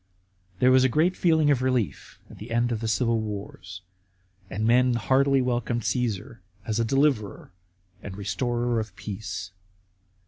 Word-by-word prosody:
There 125 Hz, +6 st, +4 dB
was 130 Hz, 0 st, +5 dB
a 130 Hz, -, +4 dB
general 155 Hz, +8 st, +3 dB
feeling 160 Hz, -5 st, +2 dB
of 130 Hz, -3 st, +2 dB
relief 125 Hz, -, -2 dB
at -, -, -14 dB
the 105 Hz, -, -9 dB
end 120 Hz, +1 st, +1 dB
of 115 Hz, -, -1 dB
the 115 Hz, -, -3 dB
civil 115 Hz, +1 st, +1 dB
wars, 100 Hz, -3 st, -7 dB, 0.7 s
and 105 Hz, +3 st, -2 dB
men 125 Hz, +1 st, +4 dB
heartily 135 Hz, +5 st, +2 dB
welcomed 120 Hz, -2 st, -1 dB
Cassar 115 Hz, -3 st, -2 dB, 0.2 s
as 110 Hz, 0 st, -1 dB
a -, -, +3 dB
deliverer 125 Hz, -7 st, 0 dB, 0.5 s
and 95 Hz, -1 st, -8 dB
restorer 120 Hz, +4 st, -1 dB
of 110 Hz, -4 st, -6 dB
peace. 100 Hz, -1 st, -6 dB
115 Hz, 150 wpm, -26 LUFS, 105-130 Hz, 0.7 s, was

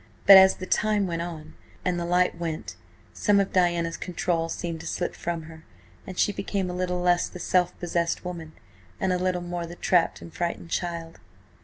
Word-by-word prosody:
But 195 Hz, -, +11 dB
as 190 Hz, 0 st, +8 dB
the 185 Hz, -, -7 dB
time 210 Hz, +1 st, +1 dB
went 170 Hz, -2 st, -2 dB
on 160 Hz, -3 st, -7 dB, 0.3 s
and 180 Hz, -2 st, 0 dB
the 170 Hz, -, -3 dB
light 180 Hz, +1 st, +2 dB
went, 165 Hz, -2 st, -5 dB, 0.4 s
some 205 Hz, -2 st, +3 dB
of 195 Hz, -, 0 dB
Diana's 175 Hz, -2 st, +1 dB
control 170 Hz, -2 st, -1 dB
seemed 165 Hz, -1 st, -4 dB
to -, -, -8 dB
slip 175 Hz, -, -2 dB
from 170 Hz, -2 st, -4 dB
her, 160 Hz, 0 st, -12 dB, 0.4 s
and 185 Hz, -1 st, -7 dB
she -, -, +3 dB
became 195 Hz, -2 st, -2 dB
a -, -, -5 dB
little 180 Hz, 0 st, -1 dB
less 175 Hz, -1 st, +2 dB
the -, -, -9 dB
self 180 Hz, 0 st, +1 dB
possessed 170 Hz, 0 st, -1 dB
woman, 165 Hz, -3 st, -6 dB, 0.5 s
and 190 Hz, -1 st, +1 dB
a 180 Hz, -, 0 dB
little 180 Hz, -1 st, 0 dB
more 175 Hz, -1 st, -4 dB
the 170 Hz, -, -9 dB
trapped 175 Hz, -1 st, +2 dB
and 165 Hz, -, -11 dB
frightened 170 Hz, -1 st, -3 dB
child. 170 Hz, -2 st, -3 dB
175 Hz, 195 wpm, -26 LUFS, 170-185 Hz, 0.5 s, But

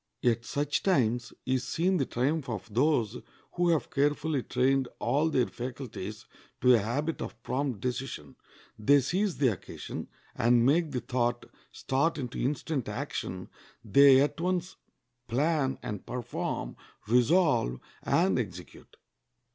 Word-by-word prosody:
At 120 Hz, -1 st, +2 dB
such 145 Hz, +2 st, -1 dB
times 120 Hz, -, +1 dB
is 130 Hz, -1 st, 0 dB
seen 180 Hz, +8 st, +1 dB
the 135 Hz, -, 0 dB
triumph 140 Hz, +3 st, -1 dB
of 105 Hz, -2 st, -6 dB
those 125 Hz, -3 st, +1 dB, 0.3 s
who 175 Hz, 0 st, +1 dB
have 165 Hz, -3 st, +1 dB
carefully 145 Hz, 0 st, +1 dB
trained 130 Hz, +2 st, +1 dB
all 150 Hz, +3 st, +1 dB
their 130 Hz, -5 st, +2 dB
faculties 120 Hz, -5 st, -7 dB, 0.4 s
to 125 Hz, -, +6 dB
a 120 Hz, -, +5 dB
habit 140 Hz, +10 st, -2 dB
of 115 Hz, -, -7 dB
prompt 130 Hz, -6 st, -2 dB
decision. 125 Hz, -, -4 dB, 0.4 s
They 140 Hz, +7 st, +5 dB
seize 185 Hz, +7 st, 0 dB
the 135 Hz, -3 st, +4 dB
occasion, 100 Hz, -6 st, -6 dB, 0.3 s
and 120 Hz, 0 st, +4 dB
make 160 Hz, +4 st, +3 dB
the 125 Hz, -4 st, -3 dB
thought 120 Hz, -1 st, -1 dB, 0.3 s
start 140 Hz, +6 st, 0 dB
into 125 Hz, -4 st, -5 dB
instant 140 Hz, 0 st, -2 dB
action; 90 Hz, 0 st, -4 dB, 0.4 s
they 135 Hz, +4 st, +7 dB
at 145 Hz, +3 st, 0 dB
once 180 Hz, 0 st, -1 dB, 0.5 s
plan 140 Hz, +1 st, +1 dB
and 105 Hz, -2 st, -5 dB
perform, 125 Hz, -2 st, -4 dB, 0.3 s
resolve 125 Hz, -, +3 dB, 0.2 s
and 175 Hz, -4 st, +2 dB
execute. 90 Hz, -6 st, -8 dB
130 Hz, 130 wpm, -29 LUFS, 120-150 Hz, 0.5 s, they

